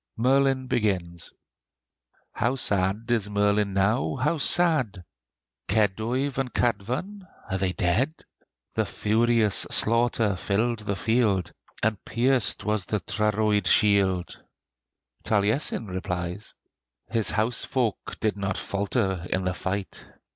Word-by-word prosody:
Merlin 135 +2 +2
begins: 95 -9 -2 1.0
"How 120 +4 0
sad 100 -3 0
is 110 -4 +1
Merlin 105 0 +1
now! 95 -5 +1
how 165 - 0
sad! 140 - +2 0.6
Keduyf 115 +7 0
and 130 -2 -2
Kadvan 125 - -2 0.2
are 95 - 0
they 95 -1 0
dead? 95 - +1 0.6
The - - 0
furious 110 -2 +2
slaughter 115 -2 +2
filled 110 +5 0
the 100 -2 -3
field, 100 -5 +1 0.3
And 110 -2 0
pierced 125 0 +1
was 105 -3 0
the 105 - -1
Tryrwyd 105 -1 +1
shield!" 95 -3 +2 0.8
Taliesin 110 +4 +1
replies: 90 0 -4 0.6
"His 115 -2 +1
house 115 +2 0
folk 120 -6 -2
did 110 -2 0
not 100 0 -2
falter 100 -3 -1
in 95 0 -1
the 90 - 0
fight!" 95 +1 -4
105 Hz, 110 wpm, -26 LUFS, 95-120 Hz, 1.0 s, Merlin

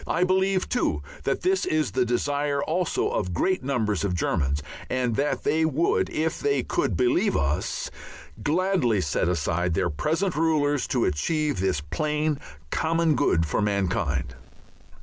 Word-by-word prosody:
I 180 - +1
believe, 190 +1 +2
too, 245 - 0 0.2
that - - -1
this 380 +1 +2
is 155 -3 0
the 125 -1 +1
desire 140 +3 0
also 175 +1 0
of 90 -1 -2
great 185 - +1
numbers 110 -8 0
of 95 -3 0
Germans, 75 -4 0 0.3
and 125 -3 0
that 145 +4 0
they 160 +2 +2
would, 160 +1 +1
if 160 +1 -1
they 425 0 +1
could - - -1
believe 340 - +2
us, 70 +2 -1 0.5
gladly 155 - +1
set 80 +2 0
aside 85 +1 0
their - - +1
present 165 - -1
rulers 150 -3 +1
to 125 -3 +1
achieve 150 - 0
this 95 -6 0
plain 150 - -1 0.3
common 165 0 +2
good 85 - +2
for 80 - -1
mankind. 90 -11 0
145 Hz, 150 wpm, -25 LUFS, -, 0.5 s, believe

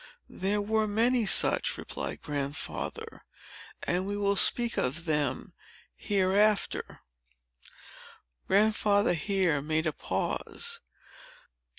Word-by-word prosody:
"There 205 +2 -2
were 220 +1 0
many 230 +2 +1
such," - - +5
replied - - -6
Grandfather, 145 -1 -5 0.6
"and 180 +2 -1
we 205 0 -3
will 200 0 0
speak 235 +4 +4
of 125 +2 0
some - - 0
of - - -12
them, 150 -5 -2 0.4
hereafter." 200 +1 0 1.5
Grandfather 205 0 +2
here 175 -3 0
made 155 +2 -1
a 155 - -1
pause. 470 0 -4
200 Hz, 100 wpm, -28 LUFS, 160-210 Hz, 1.5 s, such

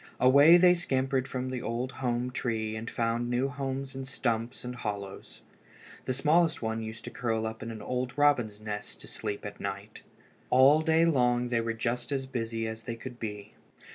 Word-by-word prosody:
Away 140 +6 +8
they 180 0 +7
scampered 135 -6 0
from 130 0 -3
the 125 -2 -3
old 120 +3 -2
home 125 -1 -2
tree 110 -3 -2
and 110 +1 -5
found 115 +1 -1
new 125 +3 +1
homes 135 -1 -4
in 135 0 -5
stumps 120 -3 -2
and 125 0 -5
hollows. 100 -4 -6 0.6
The 130 - 0
smallest 160 +4 +3
one 110 0 -2
used 110 0 -7
to - - -7
curl 110 -2 -1
up 110 0 -5
in 115 - -5
an 110 -2 -7
old 125 0 -3
robin's 125 -8 +3
nest 105 -1 -5
to - - -11
sleep 105 -2 -5
at 100 0 -7
night. 100 +2 -6 0.5
All 135 +4 +6
day 160 +1 +4
long 125 -5 +2
they 120 -1 +1
were 115 0 -2
just 120 +2 -2
as 135 -1 -1
busy 115 -3 -3
as 110 0 -6
they 115 - -3
could 120 +1 -9
be. 105 -2 -6
120 Hz, 190 wpm, -29 LUFS, 110-135 Hz, 0.6 s, Away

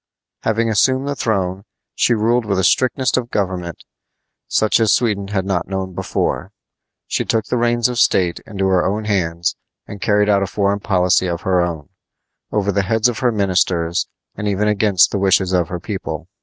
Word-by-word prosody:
Having 115 +1 0
assumed 130 +6 +2
the 145 - -2
throne, 95 -6 -1 0.3
she 120 - +2
ruled 115 +3 +1
with 100 -3 -1
a 95 - +1
strictness 130 +6 +2
of 120 -2 -2
government 90 -6 -3 0.6
such 110 +1 +2
as 110 -2 +3
Sweden 105 -5 -1
had 100 -2 -2
not 95 -3 -1
known 95 -1 -4
before. - - -2 0.5
She - - -1
took 110 -2 0
the 125 - -1
reins 120 0 +2
of 125 -1 -3
state 90 -2 +2
into 95 -3 -2
her 95 -1 +3
own 105 +3 -1
hands 85 -4 -1 0.3
and 100 -1 -10
carried 105 -1 +2
out 100 -1 +3
a 100 - 0
foreign 100 +1 0
policy 90 -2 +2
of 85 0 -3
her 95 -2 +2
own, 85 -2 -4 0.6
over 100 -1 0
the 100 - +1
heads 110 +4 +2
of 115 - -4
her 125 -2 +2
ministers, 90 -4 0 0.3
and 105 - -4
even 100 +1 0
against 105 -3 +3
the 100 - -1
wishes 95 -1 +2
of 90 -2 +2
her 90 - -5
people. 95 +1 -5
100 Hz, 185 wpm, -19 LUFS, 95-110 Hz, 0.6 s, as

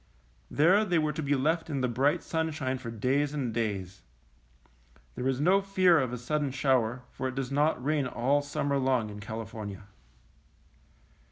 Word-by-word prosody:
There 180 +8 +4
they 180 -5 +1
were 155 -1 +1
to 160 - -4
be 145 -1 +1
left 160 +5 0
in 140 -3 -2
the 125 - +2
bright 135 +5 +1
sun 160 0 -1
shine 130 -4 -3
for 120 -2 -7
days 135 +6 0
and 125 -6 -2
days. 100 -5 -3 1.1
There 125 - -3
is 135 -1 0
no 185 +6 +4
fear 185 -4 +4
of 130 -3 -1
a 125 - -3
sudden 145 +4 -1
shower, 130 -3 +1
for 130 - -3
it 130 - -5
does 135 -1 -3
not 145 -2 +1
rain 145 -3 +1
all 135 +4 +1
sum 145 0 -3
mer 140 0 +2
long 130 -5 +1
in 105 - -8
California. 105 -2 -7
135 Hz, 180 wpm, -29 LUFS, 120-150 Hz, 1.1 s, There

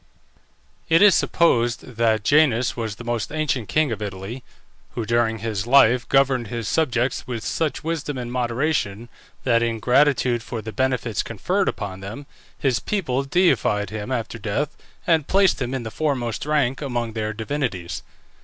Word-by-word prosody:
It 165 +4 +6
is 205 -2 +8
supposed 120 -8 +2
that 115 -3 0
Janus 130 -2 +3
was 110 -3 -3
the 120 - -10
most 120 -2 -2
ancient 145 -7 -1
king 155 -4 +2
of 110 -1 -4
Italy, 100 +5 -6 0.5
who, 115 - -2
during 115 0 +1
his 110 -1 -3
life, 125 -1 +5
governed 135 -3 +3
his 115 -1 -4
subjects 125 -4 0
with 120 -3 -4
such 160 -3 -1
wisdom 155 -3 -3
and 120 -1 -5
moderation 120 -3 -1 0.3
that, 115 -2 +3
in 115 -1 0
gratitude 125 -1 +3
for 115 +1 -5
the 110 0 -6
benefits 125 -2 0
conferred - - -1
upon 95 -2 -5
them, 105 +9 -8 0.3
his 130 -5 +1
people 140 -11 -1
deified 135 - +2
him 110 +3 -5
after 115 -2 -3
death 125 +9 -2 0.3
and 160 -4 +2
placed 195 -5 +3
him 125 -1 -2
in 130 -2 -3
the 110 - -6
foremost 130 -4 -2
rank 140 -3 +1
among 120 -5 -2
their 110 -1 -2
divinities. 110 -6 -3
120 Hz, 160 wpm, -23 LUFS, 110-140 Hz, 0.5 s, is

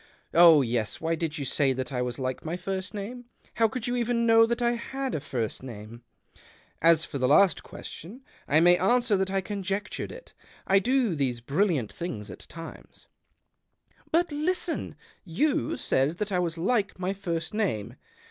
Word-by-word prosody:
Oh 165 -4 +8
yes, 115 -3 -1
why 165 +1 -1
did 160 -1 -2
you 140 - -3
say 135 0 +2
that 130 +2 -4
I 125 - -1
was 125 -1 -3
like 130 -1 -3
my 165 +2 -3
first 190 +1 -4
name? 240 +5 -6 0.3
How 225 - +5
could 230 +2 -5
you 245 -1 -1
even 235 -1 +1
know 225 0 +6
that 235 +1 -1
I 240 -1 +2
had 265 +3 -4
a - - -1
first 120 -6 -3
name? 115 -2 -9 0.3
" - - -25
" - - -35
As 165 -1 +2
for 140 - -5
the 130 - +2
last 155 +4 +5
question 220 - -10 0.2
I 155 +3 +4
may 175 +1 +6
answer 235 +2 +3
that 190 0 0
I 195 0 0
conjectured 195 +1 -4
it. - - -12 0.3
I 195 +1 +4
do 245 -1 +1
these 130 -5 -1
brilliant 145 - 0
things 110 - -5
at - - -12
times." 165 +1 -11 0.5
" - - -36
But, 335 +1 +2
listen: 330 +3 -1 0.3
you 205 - 0
said 140 +6 +1
that 210 0 -3
I 180 - +1
was 170 -2 -2
like 200 +4 0
my 185 +1 -2
first 175 -2 -4
name. 190 - -1
180 Hz, 185 wpm, -27 LUFS, 145-225 Hz, 0.5 s, Oh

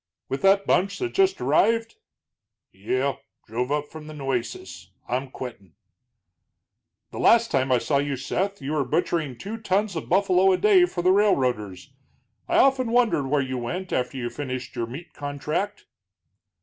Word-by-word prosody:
"With 135 - -3
that 195 +1 +4
bunch 195 +3 +1
that 365 -2 -3
just 385 0 +2
arrived?" 230 0 +2 0.7
"Yeh. 130 +7 -1 0.3
Drove 125 +4 -3
up 150 0 -1
from 155 -1 -10
the 155 - -9
Nueces. 120 -10 -4 0.2
I'm 130 +2 -2
quittin'." 100 - -9 1.4
"The - - -7
last 230 0 +4
time 135 -2 +1
I 125 - +5
saw 140 +3 +1
you, 140 0 -1
Seth, 190 +8 -2
you 140 - -3
were 150 -2 +1
butchering 155 -4 -1
two 215 - -6
tons 205 -2 0
of 160 - -5
buffalo 190 0 +4
a - - +2
day 390 -4 +5
for 175 - -4
the 185 - +5
railroaders. 125 - +1 0.5
I - - +1
often 260 -3 +4
wondered 230 - +2
where 140 0 +1
you 130 -1 -4
went 175 +10 -4
after 125 +2 -1
you 120 -2 -3
finished 130 -3 -5
your 115 -1 -2
meat 140 +9 -9
contract." 150 +8 -4
150 Hz, 160 wpm, -24 LUFS, 130-200 Hz, 1.4 s, I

